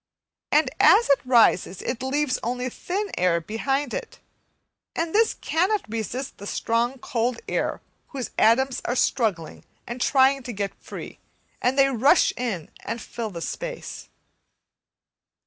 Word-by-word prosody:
and 295 -3 +3
as 390 +3 +6
it 280 - +5
rises 230 -7 +3
it 245 0 -3
leaves 270 +1 0
only 250 +2 -2
thin 395 - -4
air 175 -2 +3
behind 270 - -2
it, - - -5 0.8
and 330 0 -2
this 445 +1 +3
cannot 375 +6 0
resist 230 +4 -4
the 200 - -7
strong 235 +5 0
cold 240 0 -1
air - - -1 0.3
whose 265 -5 -5
atoms 255 +4 +3
are 245 - -1
struggling 205 - 0 0.2
and 240 +2 -6
trying 270 +1 +4
to 245 -1 -6
get 200 -1 -3
free, - - -8 0.4
and 255 +2 +1
they 275 0 +6
rush 270 +1 +4
in 215 -10 -4
and 230 - -4
fill 230 0 -5
the 170 -4 -7
space. - - -6
250 Hz, 140 wpm, -24 LUFS, 225-280 Hz, 0.8 s, as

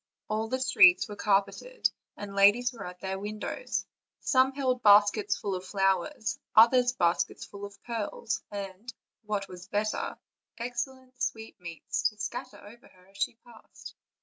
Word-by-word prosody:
All 215 +1 -1
the 260 +3 -2
streets 185 -8 +6
were 210 - -7
carpeted, 205 - 0 0.3
and 205 -1 -7
ladies 215 +6 +5
were 205 -6 -7
at 180 0 -10
the 190 0 -3
windows; 215 - -4 0.3
some 260 0 +3
held, 260 -3 0
baskets 205 -1 +5
full 200 - -3
of 185 0 -4
flowers, 195 +2 0 0.2
others 245 +2 +6
baskets 170 -7 0
full 200 0 -9
of 200 0 -12
pearls, 225 -2 -3
and,: 200 +3 -7 0.4
what 205 -2 -2
was 180 0 -11
better, 210 +1 -2 0.4
excellent 250 +2 -5
sweetmeats, 200 0 -2
to 215 - -20
scatter 210 -1 -5
over 225 +4 -15
her 185 0 -23
as 195 - -18
she 200 - -1
passed. 235 -2 -13
210 Hz, 150 wpm, -29 LUFS, 195-240 Hz, 0.4 s, streets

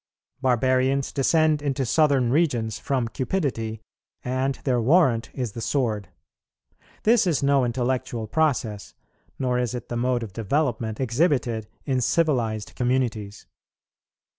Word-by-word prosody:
Barbarians 130 +1 +2
descend 155 +2 +2
into 140 -2 -1
southern 135 -2 +3
regions 125 -8 +1
from 130 -4 -1
cupidity, 115 - -2 0.4
and 130 +2 0
their 125 -3 +1
warrant 130 -3 +3
is 125 -5 -3
the 115 - -7
sword: 110 -7 -1 0.9
this 225 -3 +4
is 160 -5 +1
no 140 -1 +3
intellectual 120 -1 -1
process, 115 -6 -1 0.4
nor 125 -2 0
is 125 0 -1
it 120 -1 -7
the 120 - -3
mode 125 0 0
of 105 -4 -8
development 115 -1 -1
exhibited 125 -4 0 0.2
in 130 -3 0
civilized 120 -9 0
communities. 120 -5 -1
125 Hz, 120 wpm, -24 LUFS, 115-140 Hz, 0.9 s, this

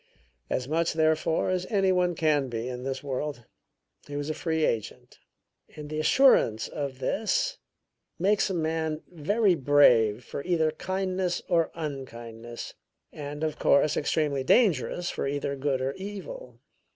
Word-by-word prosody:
As 125 - -1
much, 165 +3 0
therefore, 160 +2 +1
as 185 0 -1
any 195 -3 +2
one 180 -1 +2
can 150 -4 +1
be 115 0 -4
in 125 -1 -5
this 135 +2 -4
world 140 -2 -4 0.6
he 145 - -7
was 145 +1 -2
a - - -2
free 160 -1 0
agent; 110 -3 -4 0.6
and 150 -1 -8
the 155 - -2
assurance 155 - +4
of 140 -3 -5
this 220 - -1 0.6
makes 200 +3 +2
a 190 - -2
man 160 -1 -1
very 195 +5 +2
brave 125 -7 +4
for 140 - -6
either 165 -3 +1
kindness 185 +2 -2
or 170 -2 +2
unkindness, 120 -6 -7 0.4
and, 145 +1 -6
of 155 -1 -2
course, 145 +1 +4
extremely 145 -2 0
dangerous 175 - +2
for - - -3
either 140 0 -2
good 135 -1 -1
or 135 +1 -1
evil. 205 - -8
155 Hz, 145 wpm, -27 LUFS, 135-180 Hz, 0.6 s, assurance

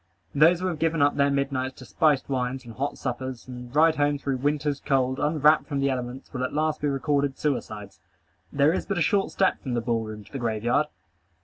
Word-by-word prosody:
Those 165 +4 +5
who - - -1
have 175 -4 -2
given 165 -1 +1
up 145 - +3
their 140 0 +3
midnights 135 -2 -1
to 130 - -12
spiced 150 +1 +2
wines, 130 -1 -2
and 115 - -9
hot 140 +5 -3
suppers, 130 -1 -5
and 125 -1 -9
ride 160 +1 +5
home 145 0 +2
through 140 -1 -2
winter's 145 +1 -1
cold, 130 -2 0
unwrapped 150 0 +3
from 140 -3 -2
the 140 0 +1
elements, 125 +1 -5
will 130 -1 -2
at 130 - -3
last 155 +1 0
be 145 - +1
recorded 140 -1 0
suicides. 105 -9 -3 0.5
There 145 +3 +3
is - - -3
but 195 - -1
a - - +1
short 200 -3 +1
step 190 - +1
from 125 -3 -3
the - - +1
ball 115 -1 0
room 105 -1 -8
to - - -20
the 135 - -5
grave 110 -3 -2
yard. 125 +6 +2
140 Hz, 225 wpm, -26 LUFS, 125-150 Hz, 0.5 s, Those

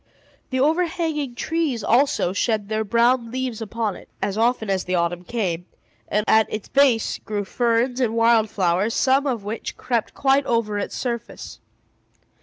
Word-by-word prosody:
The 260 - -1
overhanging 320 -3 0
trees, 305 -7 -1
also, 240 -6 +2
shed 210 0 -1
their 220 0 0
brown 235 +2 +2
leaves 250 -2 -3
upon 220 -2 -2
it, - - -14
as 195 0 -2
often 225 0 +1
as 190 -2 -1
the 185 - -1
autumn 175 0 -1
came; 180 -5 -3 0.4
and 210 +1 0
at 220 0 +4
its 215 -1 -4
base 270 -5 +2
grew 205 -2 -4
ferns 240 +3 0
and 230 -3 0
wild 230 -1 +4
flowers, 190 +3 0
some 270 +2 +3
of 240 -6 -2
which 215 +3 -5
crept 235 -3 -2
quite 275 0 +2
over 220 -3 0
its - - -4
surface. 235 -2 -5
230 Hz, 160 wpm, -22 LUFS, 210-260 Hz, 0.4 s, at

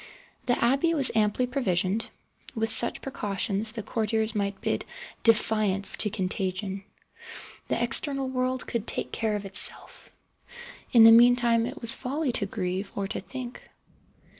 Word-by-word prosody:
The 245 - +2
abbey 275 +7 +1
was 275 -4 +4
amply 215 +3 +1
provisioned. 220 -5 -1 0.5
With 225 0 -2
such 235 - +2
precautions 210 -4 -3
the 225 -3 -6
courtiers 220 0 -2
might 200 -2 -3
bid - - -2 0.4
defiance 215 -3 +4
to 210 - +2
contagion. 190 0 -4 0.8
The - - -1
external 275 -2 +1
world 255 0 -2
could 235 -2 -4
take - - -4
care 220 -2 -2
of 205 -1 -5
itself. 195 0 0 0.8
In 230 -2 +7
the 225 - +9
meantime 235 0 +4
it - - -8
was 230 -1 +2
folly 275 +2 -3
to 220 -4 -2
grieve, 190 0 -4
or 200 -1 -3
to - - -4
think. 255 -2 -9
225 Hz, 140 wpm, -26 LUFS, 200-245 Hz, 0.8 s, the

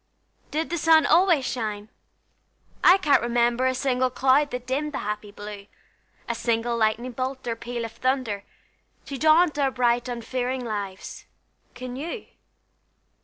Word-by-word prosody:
Did 315 +2 -2
the 340 - -1
sun 320 0 +5
always 345 -7 +4
shine? 215 -4 -3 0.9
I 365 - +8
can't 300 -7 +3
remember 240 +1 +1
A 260 - 0
single 255 -1 +1
cloud 265 +3 +3
that 250 -2 -5
dimmed 290 +4 -2
the - - -4
happy 210 0 -4
blue, 205 -1 -9 0.6
A - - -1
single 235 0 -1
lightning 230 +2 0
bolt 260 +2 -4
or 230 - -1
peal 235 0 -5
of 225 - -7
thunder, 255 -5 -1 0.6
To 275 - -6
daunt 310 +1 +4
our 275 -1 +3
bright, 245 -1 +1
unfearing 250 +1 -3
lives: 200 -4 -6 0.5
can 250 0 -7
you? 335 - -5
250 Hz, 145 wpm, -25 LUFS, 230-275 Hz, 0.9 s, I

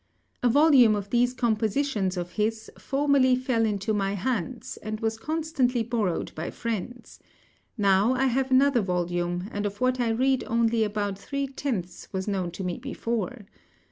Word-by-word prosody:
A 245 - +3
volume 265 -5 +6
of 200 -1 -5
these 245 +1 +3
compositions 220 -4 0
of 175 0 -4
his 220 +2 -2
formerly 275 -2 +2
fell 250 -3 +1
into 205 +1 -1
my 195 -1 0
hands, 250 +4 -3
and 215 0 -4
was 225 0 -1
constantly 275 -3 0
borrowed 220 -7 -1
by 160 +2 -4
friends; 230 +2 -5 0.6
now, 200 +4 +3
I 265 +1 +1
have 265 +1 +1
another 265 -1 +4
volume, 175 -1 -1
and 205 - -3
of 205 0 -8
what 255 0 +1
I 240 -2 +1
read 260 +3 +2
only 230 -1 +2
about 205 -2 -2
three 280 +6 -3
tenths 260 -10 -4
was 190 0 -3
known 190 -4 -1
to 180 +3 -7
me 180 -2 -3
before. 235 -3 -4
225 Hz, 160 wpm, -26 LUFS, 200-255 Hz, 0.6 s, volume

